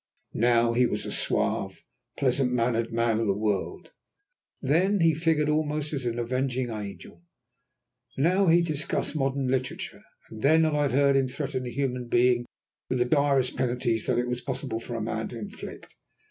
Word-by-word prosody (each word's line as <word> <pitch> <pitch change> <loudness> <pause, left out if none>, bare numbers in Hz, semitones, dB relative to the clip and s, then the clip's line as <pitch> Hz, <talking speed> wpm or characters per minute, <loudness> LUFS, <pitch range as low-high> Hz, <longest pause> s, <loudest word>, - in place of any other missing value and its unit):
Now 115 0 +3
he 125 +1 +3
was 105 -1 -3
a - - -5
suave, - - -1 0.3
pleasant 130 -1 +1
mannered 115 -1 0
man 115 -1 +1
of 115 - 0
the 100 0 +1
world, 105 -2 -2 0.7
then 180 +9 +2
he 165 -1 +5
figured 160 -1 +1
almost 150 0 -1
as 135 -4 -2
an 120 0 -2
avenging 125 +1 -1
angel; 105 +8 -8 1.0
now 180 +7 +3
he 170 +1 +5
discussed 155 -1 -1
modern 135 -2 0
literature, 130 0 -3 0.3
then 145 +9 +3
I 150 -1 +1
had 145 - +1
heard 140 0 +4
him 135 -1 +3
threaten 130 -1 -4
a - - -5
human 125 -3 -2
being 120 0 +3 0.4
with 130 - 0
the 120 - +2
direst 140 -1 +2
penalties 120 -3 -1
that - - +1
it 125 0 0
was 125 0 -2
possible 130 -2 -3
for 115 0 -5
man 110 0 -3
to 120 - -8
inflict. 105 -3 -9
130 Hz, 165 wpm, -27 LUFS, 120-145 Hz, 1.0 s, he